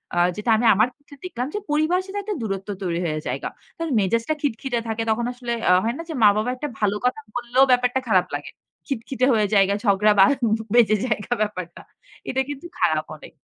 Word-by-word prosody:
আ - - -2 0.2
যেটা 210 +3 -3
আমি 235 - 0
আমার 215 +5 +4
ক্ষেত্রে 285 -1 -17
দেখলাম 250 -8 -3
যে - - 0
পরিবারের 335 +5 +1
সাথে 405 +1 -4
একটা 420 0 -3
দূরত্ব 195 -2 -4
তৈরি 175 -2 -1
হয়ে 155 -1 -2
যায়গা। - - -3 0.3
কারণ 330 -1 -3
মেজাজটা 230 +8 +1
খিটখিটে 255 -2 -1
থাকে 225 +1 -1
তখন 235 +2 0
আসলে 245 -1 -6 0.2
আ - - +6
হয় 230 +3 -1
না 335 - -6
যে - - -3
মা-বাবা 215 +3 +4
একটা 295 +4 -4
ভালো 205 -1 +1
কথা 250 +3 +1 0.2
বললেও 245 +2 +3
ব্যাপারটা 250 +1 +3
খারাপ 220 - +3
লাগে। - - -6 0.4
খিটখিটে 255 -1 -1
হয়ে 215 -2 +2
যায়গা, 195 0 +4
ঝগড়া 205 +1 +4
বা 195 - +9 0.5
বেজে 220 -3 +5
যায়গা 215 +1 -1
ব্যাপারটা। 185 -5 -4 0.5
এটা 265 +1 +1
কিন্তু 290 +4 -7
খারাপ 155 -2 +2
অনেক। - - -14
235 Hz, 195 wpm, -23 LUFS, 205-265 Hz, 0.5 s, বা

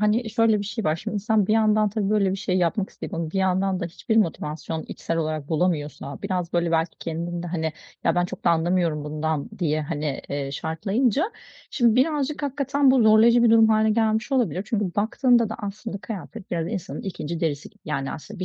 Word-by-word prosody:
hani, 220 +2 +1
şöyle 225 -1 +3
bir 205 - -3
şey 220 +2 -4
var. 155 +1 +2
Şimdi 210 +3 -4
sen 215 -1 +2
bir 215 - +2
yandan 215 -1 +3
tabii 205 -1 -1
böyle 205 -3 +3
bir 190 - -1
şey 190 -2 -1
yapmak 185 +3 0
isteyip - - -7
ama 165 -1 -3
bir 195 - -2
yandan 190 0 +1
da - - -2
hiçbir 200 +6 -2
motivasyon 160 -5 -1
içsel 165 - -3
olarak 155 -3 -2
bulamıyorsan, 155 -4 -2
biraz 180 -4 -2
böyle 170 -1 +1
belki 165 0 0
kendin 170 +1 -4
de, - - -5
hani, 160 -2 -2 0.3
ya - - +3
ben 175 0 +2
çok 180 +1 -8
da - - +5
anlamıyorum 165 -2 +1
bundan 155 0 -2
diye, 155 -3 0
hani, 150 -2 -3
eee, 140 -1 -3
şartlayınca 200 - 0 0.5
şimdi 235 -4 +3
birazcık 295 +2 +1
hakikaten 280 0 +2
bu 260 -2 +4
zorlayıcı 220 +2 +6
bir 235 - +5
durum 225 -1 +6
hâline 220 0 +3
gelmiş 220 +2 +1
olabilir. 200 - +1
Çünkü 210 -1 0
baktığında 235 +2 +3
da 220 - -4
aslında 205 0 -5
kıyafet 210 0 -8
biraz 165 -2 -1
insanın 190 0 -5
2'nci 170 -5 -5
derisi 150 -3 -2
gibi. - - -30
Yani, 140 -3 -2
aslında 200 +5 -9
bir - - -1
195 Hz, 205 wpm, -24 LUFS, 165-220 Hz, 0.5 s, zorlayıcı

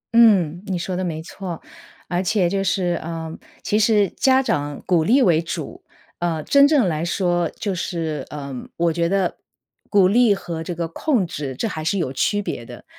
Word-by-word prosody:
嗯， 190 -8 +5
你 190 -2 -1
说 180 +2 -3
的 185 - -2
没 160 -3 -3
错， 180 -1 -7 0.5
而 175 0 0
且 190 -1 +1
就 195 +2 -1
是， 180 -2 0
呃， 165 0 -5 0.3
其 210 - +1
实 210 -3 +3
家 265 +6 +3
长 145 - -2
鼓 175 -3 +3
励 245 - +4
为 170 -7 +4
主。 165 - -6 0.4
呃， 170 -2 -1
真 280 - +6
正 280 -9 +4
来 155 -2 -1
说， 175 -1 0
就 200 - -4
是， 160 -5 -3
呃， 140 -2 -6 0.2
我 170 -1 +2
觉 170 0 0
得 190 -2 0 0.5
鼓 200 -3 +5
励 230 +2 +4
和 170 -4 -5
这 175 - -4
个 170 0 -2
控 225 - 0
制 145 -4 -5
这 225 - -2
还 160 -7 -5
是 165 +5 0
有 150 -8 -2
区 205 +9 +1
别 120 - -4
的。 - - -11
175 Hz, 205 characters per minute, -21 LUFS, 165-200 Hz, 0.5 s, 真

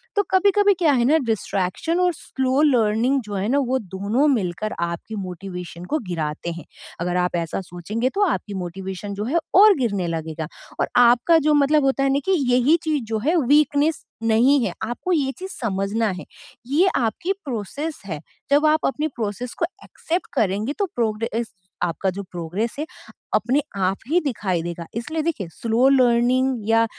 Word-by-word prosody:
तो 410 - +3
कभी-कभी 405 +2 +4
क्या 325 -4 +4
है 240 -3 +2
ना, 300 +5 +5
डिस्ट्रैक्शन 220 - -1
और 360 -1 +3
स्लो 265 -2 -1
लर्निंग 245 -1 +3
जो 210 -3 -8
है 195 +1 -1
ना, 275 - +2
वो 260 -1 0
दोनों 205 - 0
मिलकर 205 0 -2
आपकी 170 +5 -3
मोटिवेशन 180 -2 -7
को 305 - 0
गिराते 160 -1 -3
हैं। 170 0 -8 0.4
अगर 175 +1 0
आप 180 - -1
ऐसा 170 +2 -2
सोचेंगे, 190 +8 -3
तो 395 - -2
आपकी 220 - -2
मोटिवेशन 190 +3 -6
जो 205 - -3
है, 285 +9 0 0.2
और 410 +2 +8
गिरने 200 -9 -1
लगेगा 160 -1 -4 0.3
और - - +1
आपका 245 +7 +6
जो 305 - +5
मतलब 290 +1 +4
होता 270 0 +2
है 275 - +3
ना 280 - +2
कि 385 - +1 0.2
यही 255 +6 +4
चीज़ 305 -5 0
जो 220 - +1
है, 305 +10 +1
वीकनेस 295 +2 +3 0.2
नहीं 240 +5 +4
है। - - -2
आपको 240 +11 -3
ये 280 -5 +1
चीज़ 380 +1 -6
समझना 210 +1 0
है। - - -9 0.4
ये 310 +8 +3
आपकी 265 - 0
प्रोसेस 275 - -4
है। 160 -6 -5 0.3
जब 290 +2 +5
आप 310 0 +2
अपनी 300 +3 -1
प्रोसेस 225 +3 -3
को - - +3 0.2
एक्सेप्ट 345 +3 -3
करेंगे, 215 0 0
तो 400 - -1
प्रोग्रेस 230 0 -2 0.3
आपका 175 +2 0
जो 200 +2 -6
प्रोग्रेस 180 +5 -4
है, 305 - -1 0.5
अपने 255 +6 +2
आप 190 0 0
ही 340 +3 +4
दिखाई 210 - -1
देगा। 170 0 -5
इसलिए 305 +8 -2
देखिए, 295 - -2
स्लो 230 +7 +2
लर्निंग 250 -2 +3
या 225 0 +5
235 Hz, 175 wpm, -22 LUFS, 195-290 Hz, 0.5 s, और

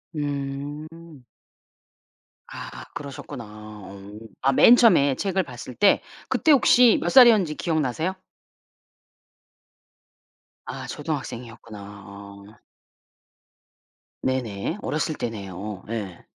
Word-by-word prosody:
음. 145 +2 -6 1.2
아 - - -9
그러셨구나. 140 -4 -8
어. 105 -2 -11 0.3
아 135 +1 +3
맨 240 - +7
처음에 145 - +4
책을 190 +2 -1
봤을 125 -2 -10
때 205 - +4 0.3
그때 315 - +2
혹시 250 -4 +6
몇 - - -1
살이었는지 220 - +6
기억 160 -3 -1
나세요? 160 +8 -2 2.5
아 - - -7
초등학생이었구나 115 -7 -6 0.3
어. 100 0 -12 1.8
네네. 125 - -2
어렸을 155 0 -2
때네요. 100 -2 -6
예. 100 -6 -6
135 Hz, 190 characters per minute, -24 LUFS, 105-165 Hz, 2.5 s, 맨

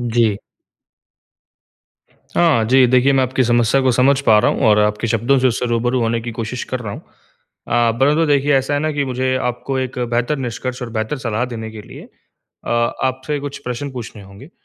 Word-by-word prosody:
जी। 115 -3 +1 2.0
हाँ 155 -10 +3
जी। 130 +1 +5
देखिए, 130 +2 +3
मैं 135 - +3
आपकी 130 +1 0
समस्या 120 +2 +2
को 130 - +3
समझ 135 +3 +3
पा 110 -5 +5
रहा - - +3
हूँ - - -3
और 105 0 +5
आपके 105 +2 +1
शब्दों 120 +4 +2
से 130 - +2
उससे 120 +1 -2
रूबरू 120 +2 0
होने 115 0 0
की 120 - -6
कोशिश 115 +2 -5
कर 130 - -1
रहा 105 -4 -5
हूँ। - - -8 0.7
अ, 120 -1 +2
पहले 140 +3 +4
तो 165 +1 +2
देखिए 145 0 +2
ऐसा 135 +2 0
है 145 - 0
ना 155 +1 0
कि 145 -1 -1
मुझे 130 0 -1
आपको 125 +2 -3
एक 130 0 -4
बेहतर 120 +4 -1
निष्कर्ष 125 0 -5
और 120 - -6
बेहतर 110 +5 -3
सलाह 115 -2 -2
देने 110 -1 -6
के 110 -1 -10
लिए - - -12 0.6
अ, - - -3 0.3
आपसे 130 +3 -2
कुछ 140 0 -6
प्रश्न 125 +3 -4
पूछने 115 -4 -8
होंगे। 100 - -14
125 Hz, 200 wpm, -18 LUFS, 115-135 Hz, 2.0 s, जी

